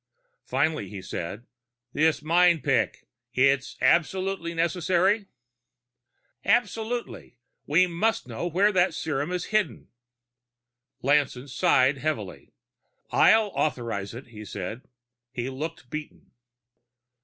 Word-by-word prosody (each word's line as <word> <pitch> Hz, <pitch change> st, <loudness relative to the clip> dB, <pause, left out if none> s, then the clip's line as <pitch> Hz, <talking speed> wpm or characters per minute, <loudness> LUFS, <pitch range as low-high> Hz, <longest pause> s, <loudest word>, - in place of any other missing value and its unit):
Finally 135 Hz, -6 st, 0 dB
he 100 Hz, -, -7 dB
said, 95 Hz, +4 st, -6 dB, 0.5 s
"This 160 Hz, 0 st, +2 dB
mind 170 Hz, 0 st, +4 dB
picking 135 Hz, -2 st, +1 dB, 0.3 s
it's 135 Hz, +1 st, +2 dB
absolutely 170 Hz, +3 st, +1 dB
necessary?" 180 Hz, +4 st, +1 dB, 1.2 s
"Absolutely. 225 Hz, -, -1 dB, 0.3 s
We 170 Hz, +6 st, +5 dB
must 180 Hz, -, -1 dB
know 120 Hz, +8 st, -4 dB
where 190 Hz, +5 st, +3 dB
that 180 Hz, -3 st, +2 dB
serum 150 Hz, 0 st, -2 dB
is 180 Hz, +1 st, -3 dB
hidden." 215 Hz, -1 st, 0 dB, 1.1 s
Lanson 140 Hz, -1 st, +1 dB
sighed 135 Hz, +1 st, +3 dB
heavily. 135 Hz, -12 st, -4 dB, 0.6 s
"I'll 220 Hz, -2 st, +5 dB
authorize 115 Hz, -8 st, -2 dB
it," 125 Hz, +1 st, -10 dB
he 105 Hz, -2 st, -10 dB
said. 105 Hz, +3 st, -6 dB, 0.5 s
He 130 Hz, 0 st, -4 dB
looked 145 Hz, -2 st, -6 dB
beaten. 150 Hz, 0 st, -8 dB
155 Hz, 100 wpm, -26 LUFS, 130-180 Hz, 1.2 s, We